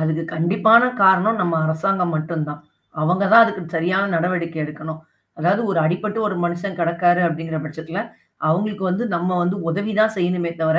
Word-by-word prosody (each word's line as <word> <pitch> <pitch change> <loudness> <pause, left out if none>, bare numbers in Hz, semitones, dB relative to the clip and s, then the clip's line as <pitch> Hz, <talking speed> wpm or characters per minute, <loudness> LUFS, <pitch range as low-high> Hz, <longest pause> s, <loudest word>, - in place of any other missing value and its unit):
அதுக்கு 160 +1 -1
கண்டிப்பான 210 +9 +4
காரணம் 190 +4 +4
நம்ம 170 -2 0
அரசாங்கம் 175 +2 0
மட்டும் 155 0 -2
தான். 145 0 -7 0.4
அவங்க 180 +5 +1
தான் 230 +1 +10
அதுக்கு 205 -5 -4
சரியான 185 +4 0
நடவடிக்கை 170 -1 -2
எடுக்கணும். 155 +1 -8 0.4
அதாவது 185 +8 +1
ஒரு 170 - 0
அடிபட்டு 205 +7 -1
ஒரு 190 - -2
மனுஷன் 175 +2 -3
கெடக்காரு 175 +1 +2
அப்பிடிங்கிற 165 -1 -3
பட்சத்துல, 160 +4 -6 0.5
அவுங்களுக்கு 200 +4 -1
வந்து 200 +7 -1
நம்ம 180 +2 -1
வந்து 180 +3 -1
உதவி 200 +6 -2
தான் 220 0 +3
செய்யணுமே 175 -2 -1
தவிர, 160 0 +2
175 Hz, 160 wpm, -20 LUFS, 160-195 Hz, 0.5 s, தான்